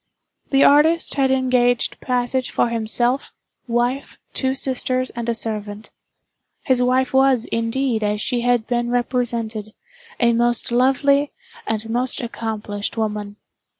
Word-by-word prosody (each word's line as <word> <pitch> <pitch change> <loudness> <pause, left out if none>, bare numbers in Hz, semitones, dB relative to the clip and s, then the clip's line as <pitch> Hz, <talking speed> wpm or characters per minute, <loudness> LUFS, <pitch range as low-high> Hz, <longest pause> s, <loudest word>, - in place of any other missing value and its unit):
The 275 0 +4
artist 315 +4 +4
had 270 -2 +1
engaged 250 -2 +1
passage 250 0 -1
for 240 - +1
himself, 235 +3 0 0.4
wife, 245 +3 -1 0.2
two 265 0 +1
sisters 255 -1 0
and 235 0 -5
a 235 - 0
servant. 215 -1 -5 0.7
His 255 -2 +2
wife 255 +1 +1
was, 265 -3 +3
indeed, 230 +1 -1
as 210 0 -1
she 240 +2 -1
had 245 -2 +1
been 240 -1 -1
represented, 235 -3 -2 0.4
a 235 -1 +3
most 240 0 0
lovely, 275 +3 +3 0.4
and 220 0 -2
most 245 +3 -1
accomplished 220 -3 -5
woman. 210 -2 -3
240 Hz, 125 wpm, -21 LUFS, 225-260 Hz, 0.7 s, The